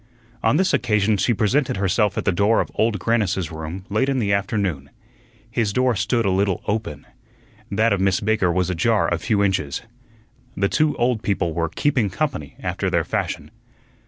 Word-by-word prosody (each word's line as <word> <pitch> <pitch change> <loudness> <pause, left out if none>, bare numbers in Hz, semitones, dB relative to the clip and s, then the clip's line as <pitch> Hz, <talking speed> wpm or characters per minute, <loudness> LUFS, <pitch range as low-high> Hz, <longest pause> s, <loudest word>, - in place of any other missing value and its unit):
On 115 +6 +3
this 190 -1 +2
occasion 110 -5 +2
she 95 +6 +1
presented 120 +4 +1
herself 100 +2 +1
at - - -2
the 95 - +3
door 100 +5 +2
of - - -2
Old 110 -1 +1
Grannis's 95 -4 0
room 80 +4 -6
late 110 +7 0
in 135 - 0
the 100 -5 +1
afternoon. 95 -8 -1 0.6
His 115 -3 0
door 125 0 +2
stood 115 +4 0
a 95 - +2
little 95 -1 0
open. 105 -9 -3 0.6
That 110 +2 +2
of 95 - -1
Miss 95 -1 +2
Baker 105 -4 +1
was 90 +1 0
ajar 100 +3 +1
a 85 - -1
few 100 +1 +1
inches. 90 -8 -1 0.7
The 100 0 +1
two 155 -1 +1
old 120 -2 +1
people 90 -6 -1
were 85 0 -1
"keeping 125 - +1
company" 105 - -3
after - - -1
their - - +1
fashion. - - -3
100 Hz, 180 wpm, -22 LUFS, 95-115 Hz, 0.7 s, On